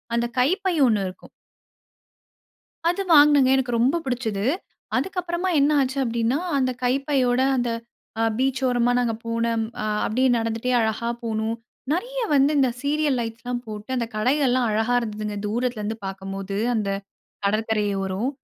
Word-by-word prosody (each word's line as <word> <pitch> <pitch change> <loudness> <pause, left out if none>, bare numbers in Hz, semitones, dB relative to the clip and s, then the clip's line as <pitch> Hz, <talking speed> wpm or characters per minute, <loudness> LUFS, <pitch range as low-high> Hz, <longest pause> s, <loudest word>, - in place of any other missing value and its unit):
அந்த 235 - +1
கைப்பை 370 +7 +2
ஒண்ணு 205 -4 +1
இருக்கும். 185 - -14 1.6
அது 360 +3 0
வாங்குனேங்க. 290 -3 +6
எனக்கு 245 -2 -1
ரொம்ப 265 +8 +3
பிடிச்சுது. 230 -5 -2 0.5
அதுக்கப்புறமா 360 -1 -2
என்ன 285 +2 +4
ஆச்சு 265 +1 -1
அப்டீன்னா. 235 +4 0 0.2
அந்த 255 -1 +1
கைப்பையோட, 260 -1 +1 0.2
அந்த 245 -1 0 0.5
அ - - +3
பீச் 265 0 +1
ஓரமா, 245 -1 +2
நாங்க 235 -2 +1
போன 230 0 -1 0.4
அ - - -1 0.2
அப்டியே 255 +4 +2
நடந்துட்டே 230 +2 -1
அழகா 220 +1 -1 0.2
போனோம். 220 0 -1 0.4
நிறைய - - -3 0.2
வந்து 280 +2 +4
இந்த 265 -2 +4
சீரியல் 290 -2 +1
லைட்ஸ்லாம் 240 +1 -4
போட்டு, 215 +3 -8
அந்த 235 -2 0
கடைகள்லாம் 255 +1 +2
அழகா 220 +3 +1
இருந்ததுங்க, 215 -2 -4
தூரத்திலருந்து 225 -1 -2
பார்க்கும்போது, 195 +1 -5 0.2
அந்த 210 -3 -1 0.6
கடற்கரை 215 +1 +1 0.2
ஓரம். 195 +7 -1
245 Hz, 135 wpm, -24 LUFS, 220-270 Hz, 1.6 s, வாங்குனேங்க